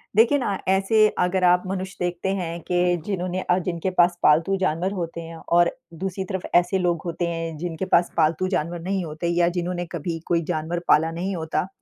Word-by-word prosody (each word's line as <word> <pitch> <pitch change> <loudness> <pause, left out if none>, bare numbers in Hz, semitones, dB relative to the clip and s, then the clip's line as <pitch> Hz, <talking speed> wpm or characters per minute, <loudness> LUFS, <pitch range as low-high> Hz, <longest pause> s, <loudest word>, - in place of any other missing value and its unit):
देखिए 235 +6 +5
ना 205 -7 -1
ऐसे 195 +3 +4
अगर 180 +1 +1
आप 180 0 +4
मनुष्य 190 0 -4
देखते 175 +1 -2
हैं 170 -2 -4
कि 180 0 +1
जिन्होंने 185 -2 -2
अ, 180 - +1
जिनके 180 0 -2
पास 175 0 +4
पालतू 160 +6 +4
जानवर 185 +1 0
होते 170 -2 -4
हैं 165 0 -9
और 175 0 +4 0.2
दूसरी 190 +2 -4
तरफ 190 -1 -2
ऐसे 175 +2 +4
लोग 175 -2 0
होते 170 0 -2
हैं 165 -1 -3
जिनके 175 +2 -4
पास 175 -2 +3
पालतू 165 +3 +2
जानवर 175 -2 -2
नहीं 190 +2 -1
होते 155 +2 -4
या 170 0 +2
जिन्होंने 175 0 -3
कभी 165 0 -3
कोई 170 -1 +2
जानवर 170 0 -2
पाला 160 +2 +4
नहीं 185 +4 -3
होता, 160 +1 -2
175 Hz, 195 wpm, -23 LUFS, 170-185 Hz, 0.2 s, देखिए